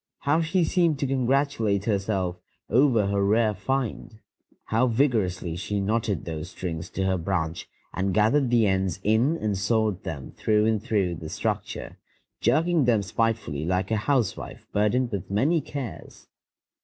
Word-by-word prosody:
How 145 +4 +2
she 170 +3 +1
seemed 165 -2 +2
to 140 - -1
congratulate 130 -6 +1
herself 95 -4 -1 0.3
over 120 -3 +4
her 100 0 +1
rare 110 +2 +3
find! 115 +1 -3 0.5
How 115 +4 +2
vigorously 110 - 0
she 100 +3 -2
knotted 105 -2 -1
those 80 0 -5
strings 85 -4 -5
to 95 - -1
her 95 -1 +1
branch 85 -2 -2 0.2
and 95 +1 -1
gathered 115 +7 +3
the 120 -2 +4
ends 95 -2 0
in 115 +10 +2
and 105 -8 -1
sewed 105 -1 0
them 70 -4 -6
through 105 0 +1
and 110 -2 +1
through 100 -7 0
the 80 -1 -7
structure, - - -4 0.4
jerking 165 -2 +2
them 115 -4 +3
spitefully 105 -8 -1
like 90 +5 -1
a 110 - +2
housewife 120 -2 -1
burdened 115 +4 +1
with 100 -5 -4
many 145 - +2
cares! 140 -4 -7
105 Hz, 150 wpm, -26 LUFS, 95-125 Hz, 0.5 s, over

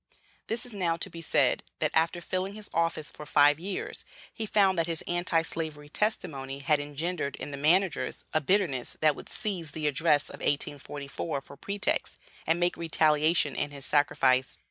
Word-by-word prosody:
This 230 +2 0
is 245 - -5
now 175 -5 0
to 185 +2 -4
be 165 - -7
said: - - +2 0.2
that, - - 0
after 165 +2 +2
filling 185 +3 -2
his 215 -1 -10
office 165 -2 0
for - - -9
five 145 0 +5
years, 190 +2 -4 0.3
he 220 -2 -4
found 195 -2 +4
that 165 - +1
his 165 -1 -1
Anti 175 -2 +1
slavery 155 -3 -5
testimony 150 -9 -2
had 145 +2 +2
engendered 145 +1 -3
in 145 - -6
the 140 - -5
managers 175 +6 +2
a 155 - +3
bitterness 150 -6 0
that 155 -2 +4
would - - -9
seize 175 -8 -3
the 155 -1 -3
address 150 0 +2
of - - -9
1844 145 +1 -2
for 140 - -13
pretext, 200 +7 -2 0.3
and 165 +1 +3
make 175 0 +1
retaliation 155 -2 +3
in - - 0
his 140 -1 -6
sacrifice. 130 -3 +2
160 Hz, 175 wpm, -29 LUFS, 145-180 Hz, 0.3 s, five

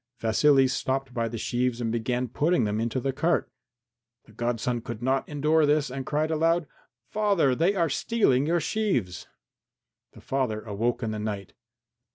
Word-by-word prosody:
Vasily 135 +5 +4
stopped 130 +1 -2
by 115 -1 -1
the 115 +1 -5
sheaves 125 +1 -1
and 115 -2 -1
began 120 +2 -1
putting 150 +4 +1
them 105 +1 -1
into 115 +3 -1
the 135 +1 -2
cart. 165 +6 0 0.7
The - - -20
godson 120 +1 -2
could 115 -1 -7
not 130 +1 0
endure 150 +1 +2
this 150 -2 +2
and 135 0 -5
cried 155 +2 0
aloud, 165 +1 +2 0.5
"Father, 200 -10 +2
they 170 +9 +2
are 170 -3 +2
stealing 145 - +1
your 170 +1 +2
sheaves!" 160 - -1 0.9
The - - -14
father 125 -6 -2
awoke 115 +4 -2
in 110 - -1
the 110 - -4
night. 105 -3 -5
130 Hz, 165 wpm, -26 LUFS, 115-155 Hz, 0.9 s, Vasily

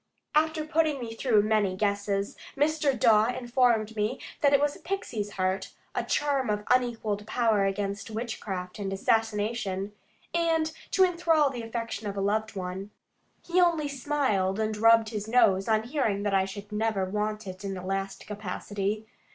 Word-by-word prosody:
After 315 0 +2
putting 310 -2 +1
me 230 -2 -5
through 225 -3 +3
many 210 -3 +2
guesses, 200 0 -1 0.2
Mr. 290 -3 +2
Dawe 220 -1 +5
informed 240 -3 +2
me 215 +4 -1 0.2
that 285 - +5
it 280 - +5
was 290 0 +1
a - - -13
pixie's 220 - -4
heart, 185 0 -1 0.2
a - - -1
charm 280 -4 0
of 210 0 0
unequalled 225 -4 0
power 225 -5 +2
against 200 +1 -2
witchcraft 210 -5 -5
and 195 -1 -3
assassination, 210 -1 0 0.4
and 325 -2 +1 0.2
to 380 - +4
enthral 330 -5 +2
the 245 -3 -5
affection 225 -2 -4
of 200 0 -4
a - - 0
loved 215 +2 0
one. 190 +1 -5 0.6
He 360 +1 +3
only 335 -4 +3
smiled, 260 -9 0
and 215 0 0
rubbed 225 +1 +5
his 210 -2 -4
nose, 195 -5 +4
on 220 -1 +2
hearing 230 -6 -1
that 205 -1 0
I 190 -1 +3
should 200 +2 -8
never 210 -2 0
want 210 +2 -2
it 185 +1 -8
in 195 -1 -3
the 185 - -7
last 195 +1 -3
capacity. 205 +1 -3
215 Hz, 165 wpm, -28 LUFS, 200-255 Hz, 0.6 s, Dawe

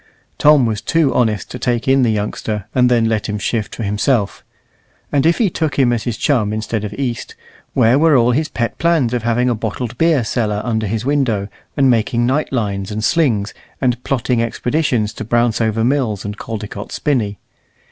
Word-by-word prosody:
Tom 150 -3 +6
was 110 -2 -2
too 160 -5 +1
honest 110 -5 0
to - - -6
take 120 0 -1
in 135 0 +4
the 120 - +3
youngster, 105 -1 -2
and 125 -1 +4
then 120 -2 +3
let 110 -2 -1
him 105 - -2
shift 105 +1 -2
for 115 - -5
himself; 105 +1 0 0.7
and 145 +1 +2
if 170 - +3
he 230 - +3
took 160 -5 -2
him 125 -3 +3
as 115 - -2
his 120 -3 -2
chum 115 -8 +1
instead 110 0 -3
of 105 - -4
East, 125 -4 -4 0.4
where 120 +5 +4
were 160 -3 +5
all 120 0 +3
his 150 +5 0
pet 115 -2 -3
plans 160 -8 +2
of 120 - 0
having 120 +2 +1
a 125 - +2
bottled 115 +2 -4
beer 160 -6 +3
cellar 110 -2 -1
under 110 -3 -1
his 110 +3 -3
window, 125 -8 0 0.3
and 135 -1 +4
making 120 +1 +1
night 135 +5 0
lines 100 -6 -2
and 110 0 -4
slings, 115 -8 +1 0.3
and 125 -2 0
plotting 125 -2 0
expeditions 120 -2 0
to 110 - -6
Brownsover 115 -1 +1
Mills 120 -7 0
and 105 0 -4
Caldecott's 105 -2 -6
Spinney? 110 -9 -1
120 Hz, 190 wpm, -18 LUFS, 110-135 Hz, 0.7 s, Tom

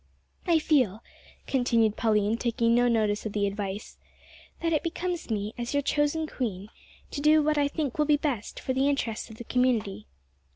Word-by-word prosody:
"I 340 -2 +5
feel," 255 - +1 0.4
continued 230 -5 +2
Pauline, 215 -2 +2
taking 230 -1 +1
no 245 +1 +4
notice 215 -2 +1
of 210 - -7
the 205 -1 +1
advice, 200 0 -5 0.6
"that 330 -1 0
it 305 - +2
becomes 345 -1 -3
me, 210 -1 -2
as 240 +4 -3
your 285 - +2
chosen 295 +3 +1
queen, 215 -9 -4 0.4
to 285 - -4
do 305 +1 +5
what 300 0 +2
I 285 - +3
think 290 -2 -3
will 300 - +4
be 300 -1 +4
best 270 -8 -3
for 260 - -2
the 270 +2 +2
interests 240 -6 -2
of 220 - -10
the 235 - -7
community." 235 - 0
245 Hz, 180 wpm, -27 LUFS, 215-295 Hz, 0.6 s, I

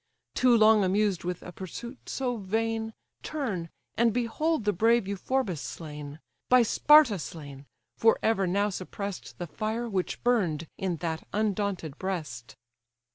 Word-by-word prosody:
Too 250 -2 +4
long 215 -1 +6
amused 195 0 +1
with 180 0 -4
a - - -8
pursuit 235 - -8
so 250 -3 -2
vain, 225 +2 -2 0.3
Turn, 205 - -3 0.3
and 235 0 +3
behold 245 +4 0
the 210 - +2
brave 225 +2 +3
Euphorbus 200 - -1
slain; 150 -2 -7 0.3
By 250 -1 +7
Sparta 270 -2 +5
slain! 145 -4 -9 0.3
for 225 0 +4
ever 195 -4 +2
now 200 +3 +1
suppress'd 195 +1 -6
The 175 - -4
fire 220 +7 -3
which 190 -5 -3
burn'd 185 -11 +1
in 185 -3 -2
that 160 -1 -3
undaunted 200 -7 -1
breast!" 155 -12 -5
205 Hz, 135 wpm, -28 LUFS, 175-230 Hz, 0.3 s, By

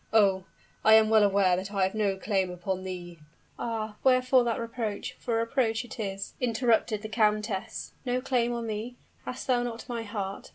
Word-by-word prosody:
"Oh! 195 -4 +4 0.4
I 220 0 +8
am 220 0 +5
well 220 -1 +6
aware 195 -3 +4
that 190 +3 -4
I 195 -2 +1
have 190 - +1
no 205 -3 0
claim 190 -2 0
upon 180 +1 -3
thee 175 -2 -7 0.2
" - - -31
"Ah! 220 -2 -3
wherefore 255 -1 +5
that 230 -1 0
reproach? 230 -2 -4
for 235 - -2
a 230 0 +1
reproach 230 -2 0
it 240 - -10
is!" 195 -2 -4
interrupted 230 -3 +1
the - - -3
countess. 215 -2 -1
"No 250 0 0
claim 250 -2 +1
on 235 -1 -3
me! 225 +3 -4 0.3
Hast 255 - -5
thou 250 -2 +2
not 240 -1 -5
my 240 -2 -3
heart? 205 -3 -5
220 Hz, 195 wpm, -28 LUFS, 195-235 Hz, 0.4 s, I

